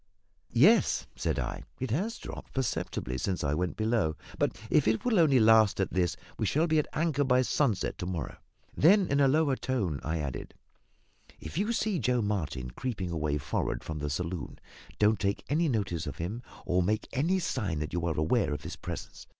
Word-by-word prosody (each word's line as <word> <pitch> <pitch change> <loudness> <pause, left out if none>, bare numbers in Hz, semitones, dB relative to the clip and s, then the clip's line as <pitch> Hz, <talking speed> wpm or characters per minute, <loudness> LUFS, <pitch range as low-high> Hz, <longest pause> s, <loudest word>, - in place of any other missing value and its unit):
"Yes," 190 - +5
said - - -1
I, - - -3 0.2
"it 130 -3 -3
has 200 - -1
dropped - - -9
perceptibly 65 - -2
since 95 +4 -1
I 70 0 +1
went 90 +3 -1
below; 110 -8 +1 0.2
but - - +1
if 150 -6 +4
it 110 0 +1
will 230 -6 +3
only 145 -6 +5
last 110 -2 +5
at 95 - 0
this 90 -2 +1 0.2
we - - +1
shall 155 +3 +2
be 160 -2 +3
at 150 - -1
anchor 155 -3 +1
by 130 -1 +3
sunset 120 -7 0
to 90 - -3
morrow." 80 -9 -4 0.4
Then, 190 +5 +5
in 140 -4 +1
a 140 - +5
lower 145 0 +3
tone, 100 - -1
I 80 +2 -1
added, 70 -6 -5 0.8
"If - - -8
you 205 +7 0
see 215 -5 0
Joe 125 -1 +1
Martin 80 -12 -2
creeping 100 - -4
away 75 -3 0
for'ard 70 - -2
from 80 -1 -5
the 75 0 -2
saloon, 85 +3 -4 0.4
don't 105 0 +3
take 100 0 -1
any 160 +2 +2
notice 95 - -1
of - - -5
him, 100 +8 -4 0.2
or 90 0 +2
make 105 +4 0
any 160 +8 +2
sign 110 - -2
that 75 0 -4
you 85 -1 -1
are 80 - -1
aware 80 +2 +2
of - - -8
his - - -6
presence. - - -7
110 Hz, 195 wpm, -29 LUFS, 85-140 Hz, 0.8 s, Yes